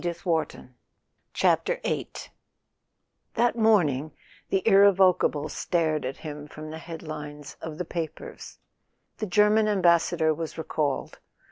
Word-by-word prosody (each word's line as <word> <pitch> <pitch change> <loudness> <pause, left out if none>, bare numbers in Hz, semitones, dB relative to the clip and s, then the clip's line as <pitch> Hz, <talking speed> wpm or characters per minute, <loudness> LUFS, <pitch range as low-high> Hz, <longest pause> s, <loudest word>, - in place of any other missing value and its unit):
A - - -14
SON 175 - 0
AT 170 - -4 0.3
THE - - -13 1.2
FRONT - - -15
VIII - - -1
T - - -10 1.0
HAT 240 +1 +2
morning 165 - +2 0.4
the 195 +3 0
irrevocable 190 -7 +4
stared 155 -2 -1
at 130 +1 -4
him 150 -1 -8
from 155 +1 -9
the 160 - -7
head 165 -1 -8
lines 150 -2 -8
of 155 -2 -6
the 180 - -3
papers. 165 -1 -6 0.6
The 215 - -2
German 210 +3 +4
Am¬ 205 -2 +1
bassador 170 -2 +3
was 160 0 -6
recalled. 150 -3 -2
165 Hz, 140 wpm, -26 LUFS, 155-195 Hz, 1.2 s, irrevocable